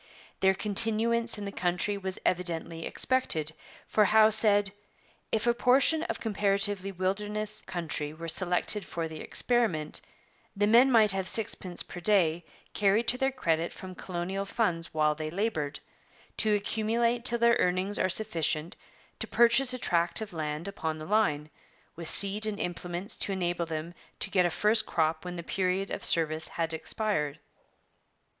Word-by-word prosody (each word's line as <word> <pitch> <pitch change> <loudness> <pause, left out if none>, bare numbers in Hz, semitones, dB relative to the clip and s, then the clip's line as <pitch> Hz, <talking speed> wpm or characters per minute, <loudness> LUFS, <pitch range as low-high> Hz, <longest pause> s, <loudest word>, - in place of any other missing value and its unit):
Their 190 0 +3
continuance 225 +3 +1
in 205 - -6
the 200 - -5
country 180 +2 -1
was 190 -1 -5
evidently 170 -2 -1
expected, 165 -13 +2 0.4
for 215 - +3
Howe 220 +2 +5
said: 205 -2 +3 0.6
'If 220 0 0
a 240 - +4
portion 265 +6 +3
of - - -3
comparatively 200 -2 +1
wilderness 210 +3 -2
country 150 -4 -3
were 165 +2 -8
selected 180 +4 0
for 165 -2 -4
the 160 -1 -9
experiment, 225 -11 0 0.5
the 205 +1 +2
men 240 +5 +5
might 220 -4 +5
have 190 -1 -1
sixpence 190 -5 -1
per 175 - -9
day 175 -4 +2 0.3
carried 210 +3 +2
to 250 - +3
their 270 0 +1
credit 165 -10 -1
from 185 -1 -9
colonial 185 +2 -4
funds 180 -5 -1
while 155 -2 +2
they 155 0 -5
laboured, 165 -6 -2 0.6
to 215 -1 +2
accumulate 230 +3 0
till 240 -1 +1
their 235 0 +4
earnings 185 +3 0
are - - +1
sufficient 170 -5 -1 0.4
to - - -3
purchase 240 +2 +4
a 255 - -2
tract 170 -7 0
of 215 -4 -7
land 155 +1 -4
upon 160 -5 -4
the 155 - -8
line, 155 -7 0 0.4
with 165 -1 -3
seed 205 +2 +3
and 210 -2 -4
implements 175 +2 -5
to - - 0
enable 175 -2 -2
them 160 +1 -5 0.2
to - - +2
get 180 -3 +3
a - - -1
first 215 +5 +2
crop 160 -1 0
when 180 0 -5
the 170 - -6
period 190 +2 -1
of - - -4
service 160 -1 +1
had 165 -1 -3
expired.' 160 -4 -2
195 Hz, 160 wpm, -29 LUFS, 170-215 Hz, 0.6 s, Howe